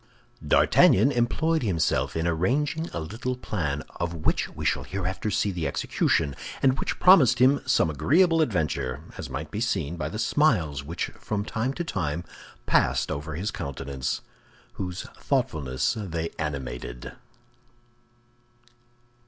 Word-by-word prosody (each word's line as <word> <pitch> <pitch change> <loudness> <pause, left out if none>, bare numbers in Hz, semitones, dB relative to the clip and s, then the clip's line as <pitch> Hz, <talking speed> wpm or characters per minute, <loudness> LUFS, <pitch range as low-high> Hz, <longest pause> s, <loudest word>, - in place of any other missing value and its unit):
D'Artagnan 110 +9 +5
employed 150 +6 +1
himself 90 -9 0
in 80 - -1
arranging 140 - 0
a - - -4
little 110 +10 -4
plan, 75 - -3
of 85 0 -2
which 80 - 0
we - - -7
shall - - +2
hereafter 95 +2 -3
see 105 -1 +1
the 85 -5 -2
execution, 70 0 0 0.3
and 135 0 +3
which - - -2
promised 145 - +7
him 130 +3 +4
some - - +3
agreeable 160 - +3
adventure, 75 - -1 0.2
as - - -5
might 80 +2 -5
be 105 - -3
seen 85 -9 -1
by 80 -1 -3
the 105 - -5
smiles 105 - +2
which 85 +4 -4
from 105 -1 -3
time 115 +4 -1
to 175 - -2
time 85 - -2 0.4
passed - - +2
over 75 +2 -4
his 100 +6 -2
countenance, 70 -1 -4 0.5
whose 90 -1 -4 0.2
thoughtfulness 70 -1 0
they 85 -6 -3
animated. 60 -5 -5
90 Hz, 135 wpm, -26 LUFS, 75-120 Hz, 0.5 s, promised